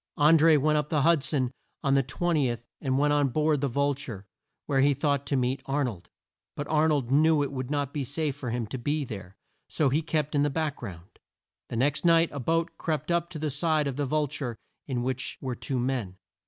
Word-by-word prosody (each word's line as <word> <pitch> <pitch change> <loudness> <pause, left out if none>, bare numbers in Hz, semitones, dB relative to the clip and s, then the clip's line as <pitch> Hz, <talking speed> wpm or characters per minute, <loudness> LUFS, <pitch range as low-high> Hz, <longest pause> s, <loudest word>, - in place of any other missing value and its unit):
An 150 +2 +6
dré 160 0 +6
went 150 +2 +3
up 150 0 -3
the 150 -3 +1
Hud 165 -2 +4
son 135 -2 -1 0.3
on 140 -2 +2
the 135 - +5
20th 135 -4 -1 0.2
and 130 -2 0
went 145 +1 +3
on 145 -2 +3
board 150 +1 +1
the 140 - +1
Vul 140 +3 +1
ture 125 -8 -8 0.4
where 135 -2 +1
he 140 +1 +4
thought 140 0 0
to 140 - 0
meet 130 +1 0
Ar 140 +1 +1
nold. 95 -8 -6 0.5
But 145 - -4
Ar 155 0 +3
nold 140 -6 0
knew 155 +1 +4
it 140 - -3
would 130 -2 -4
not 145 -2 -1
be 145 - -2
safe 140 +2 -2
for 130 -4 -5
him 120 0 -2
to 125 +4 -6
be 145 +4 -1
there; 95 -5 -8 0.3
so 150 -3 +2
he 145 +5 +1
kept 155 -2 -1
in 145 - +2
the 145 - +2
back 150 0 -2
ground. 95 -6 -10 0.5
The - - -4
next 140 +5 +1
night 165 -1 +5
a 140 - -5
boat 165 +6 -1
crept 155 0 -2
up 170 0 +1
to 175 - -7
the 155 -1 -2
side 155 +1 +1
of 140 -2 -2
the 145 +1 -1
Vul 150 +2 +1
ture 135 -5 -5 0.3
in 125 -4 -2
which 130 0 -2
were 130 -2 -3
two 130 +2 -3
men. 120 -7 -2
145 Hz, 235 wpm, -27 LUFS, 130-155 Hz, 0.5 s, An